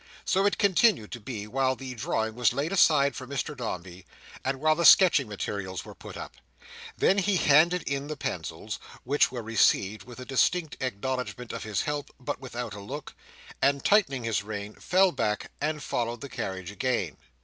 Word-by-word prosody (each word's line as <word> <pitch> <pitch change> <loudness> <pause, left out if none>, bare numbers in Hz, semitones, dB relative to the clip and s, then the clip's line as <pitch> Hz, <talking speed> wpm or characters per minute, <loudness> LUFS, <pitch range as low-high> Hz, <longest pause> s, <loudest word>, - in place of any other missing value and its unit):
So 195 +2 +3
it 205 - 0
continued 200 - +3
to 120 - -6
be 105 -2 -6
while 130 +4 +1
the 130 -1 -7
drawing 110 -1 -2
was 120 -1 +2
laid 140 +5 -1
aside 150 -7 +4
for 130 - -7
Mr 140 +2 -3
Dombey, 90 -7 -6 0.4
and 135 0 -1
while 155 +2 +4
the 170 +2 -1
sketching 165 - +7
materials 100 -2 -4
were - - -10
put - - -10
up; - - -8 0.6
then 195 - +3
he 195 0 +2
handed 170 +4 +4
in 140 0 -3
the 155 -1 -5
pencils 80 - -4 0.2
(which 140 +1 +2
were 120 -2 -5
received 110 -2 +2
with 125 0 -11
a 125 - -7
distant 155 +5 +1
acknowledgment 125 0 -3
of - - -5
his 105 -2 -1
help, 150 -1 -3
but 125 - -4
without 120 -4 -5
a 100 - -7
look), 135 +9 -7 0.5
and 140 0 +2
tightening 140 - +3
his 115 -2 0
rein, 105 0 -6
fell 185 0 +3
back, 105 -7 -2
and 150 0 -1
followed 120 -1 -2
the 140 - -7
carriage 95 -7 -5
again. 105 - -1
130 Hz, 180 wpm, -28 LUFS, 110-150 Hz, 0.6 s, sketching